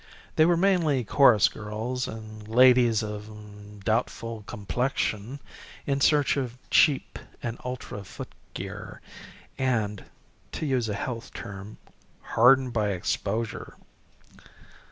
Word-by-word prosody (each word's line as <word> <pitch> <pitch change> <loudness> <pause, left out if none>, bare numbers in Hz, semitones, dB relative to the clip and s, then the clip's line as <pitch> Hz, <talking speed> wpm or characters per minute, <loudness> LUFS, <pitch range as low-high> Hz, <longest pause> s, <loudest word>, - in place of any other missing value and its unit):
They 155 - +5
were 175 -1 +3
mainly 170 -8 +2
chorus 115 -2 +5
girls 110 +4 -4
and 110 -1 -9
ladies 120 -1 +5
of 105 -1 -9
doubtful 115 +1 -1
complexion 110 +3 -2 0.5
in 140 -1 0
search 145 0 +3
of 125 -3 -3
cheap 145 -4 +3 0.2
and 120 0 -4
ultra 125 -5 -6
footgear, 95 - -9 0.6
and 110 -6 0 0.5
to - - -3
use 130 -5 0
a 105 - -2
health 115 0 -5
term 100 0 -8 0.6
hardened 125 +2 +5
by 110 -2 +1
exposure. 105 +4 -3
115 Hz, 105 wpm, -27 LUFS, 105-130 Hz, 0.6 s, They